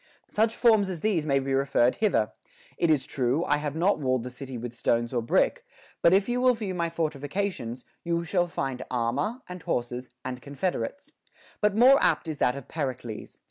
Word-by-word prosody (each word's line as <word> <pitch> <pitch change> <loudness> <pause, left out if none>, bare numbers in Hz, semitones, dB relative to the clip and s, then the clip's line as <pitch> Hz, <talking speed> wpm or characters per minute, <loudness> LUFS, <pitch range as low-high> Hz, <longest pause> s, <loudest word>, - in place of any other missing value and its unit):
Such 220 +1 +2
forms 220 -5 +4
as 175 -4 -5
these 180 -8 +1
may 140 -1 +3
be 135 0 -1
referred 135 -2 +2
hither: 200 - +2 0.4
It 170 - +1
is 145 -4 +3
true, 135 +3 0
I 150 - +2
have 150 -1 -3
not 175 +2 +2
walled 130 -4 0
the 125 - -6
city 130 0 -7
with 120 0 -6
stones 120 0 0
or 120 - +1
brick; 115 - +1 0.4
but 170 - +6
if 195 +1 +4
you 245 +1 0
will 255 -1 +5
view 210 -4 -4
my 170 -2 -1
fortifi 155 -4 -3
cations, 140 - -3 0.2
you 170 0 0
shall 175 +1 +1
find 135 -6 -3
armor, 130 - -1
and 180 -1 -8
horses, 125 -2 -3 0.2
and 125 -1 -4
confederates.* 175 - -3 0.5
But 210 -1 +3
more 260 +5 +7
apt - - +2
is 155 -3 -4
that 125 - +2
of 140 - -8
Pericles. 130 -7 -5
150 Hz, 195 wpm, -27 LUFS, 125-190 Hz, 0.5 s, more